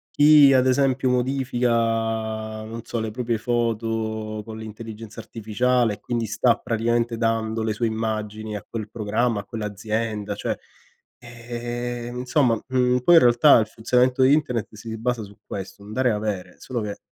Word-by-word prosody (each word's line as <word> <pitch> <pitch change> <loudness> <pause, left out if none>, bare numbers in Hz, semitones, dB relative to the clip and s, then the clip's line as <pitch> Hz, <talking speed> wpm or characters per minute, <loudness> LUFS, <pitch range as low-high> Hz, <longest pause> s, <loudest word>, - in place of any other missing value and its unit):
chi 145 -1 +7
ad 130 -1 +4
esempio 130 0 +2
modifica, 125 -1 0 0.9
non 115 +1 -7
so, 115 - -4
le 110 -1 -3
proprie 120 0 -1
foto 110 -2 -2
con 110 0 -8
l'intelligenza 110 0 -8
artificiale 115 +1 0
e 100 - -10
quindi 120 0 -2
sta 115 +2 +2
praticamente 115 +1 0
dando 115 -1 0
le 110 - 0
sue 115 +2 0
immagini 110 -1 -3
a 100 - -11
quel 110 -2 -5
programma, 110 +1 0
a 100 - -7
quell'azienda, 105 -1 -3
cioè, - - -3 0.6
ehm, 120 0 -6
insomma, 125 -2 +2
mhmm, 125 -1 +2
poi 170 +8 +5
in 165 - +8
realtà 120 +4 +6
il 110 - 0
funzionamento 125 +3 +1
di 135 +2 +6
internet 135 -7 0
si 110 +1 -7
basa 120 0 -1
su 100 0 -13
questo, 95 0 -7
un 105 - -9
dare 130 +1 +2
e - - +2
avere, 105 -4 -3
solo 125 -3 -4
che 105 -1 -4
115 Hz, 160 wpm, -23 LUFS, 110-125 Hz, 0.9 s, in